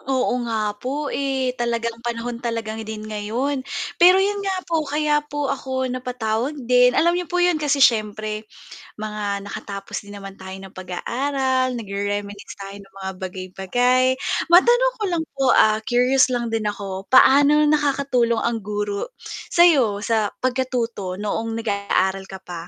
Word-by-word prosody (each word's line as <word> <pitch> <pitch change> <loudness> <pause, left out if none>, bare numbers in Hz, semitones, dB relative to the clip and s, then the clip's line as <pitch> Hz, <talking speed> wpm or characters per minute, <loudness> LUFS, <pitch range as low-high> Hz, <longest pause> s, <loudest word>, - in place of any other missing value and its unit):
Oo 260 -1 0 0.2
nga 215 -2 -1
po 280 +3 -3
eh, 265 -2 -1
talagang 235 -1 -1
panahon 235 0 -4
talagang 225 -2 -3
din 215 -1 -6
ngayon, 220 +6 -2 0.4
pero 360 +2 +8
yun 400 +1 +1
nga 390 -1 -1
po 335 -2 0
kaya 295 +1 +1
po 290 -1 -2
ako 260 -1 -3
napatawag 250 +1 -2
din, 250 -1 +3
alam 340 +2 +4
n'yo 355 -1 -2
po 355 - -2
yun 355 -3 +2
kasi 285 -2 +4
syempre 215 -1 0 0.5
mga 210 -2 -3
nakatapos 200 0 -6
din 205 - -12
naman 195 0 -9
tayo 190 -1 -10
ng 190 -1 -12
pag-aaral, 255 +7 -1
nag-re-reminisce 205 -1 -5
tayo 195 0 -8
ng 195 0 -22
mga 190 0 -3
bagay-bagay. 195 +8 0 0.5
Matanong 485 +8 +5
ko - - -2
lang 340 -3 -1
po, 275 -1 -1
ah, 215 0 +5
curious 250 +3 +3
lang 240 -2 -2
din 220 -2 -1
ako, 195 -2 -5
paano 285 +3 +6
nakakatulong 280 -6 +1
ang 235 -1 0
guro 205 - -4 0.3
sayo 270 - +4
sa 220 -2 +1 0.2
pagkatuto 245 -7 -1
noong 225 +3 -3
nag-aaral 200 -3 -1
ka 190 -1 -10
pa? 175 -1 -8
235 Hz, 150 wpm, -22 LUFS, 205-275 Hz, 0.5 s, pero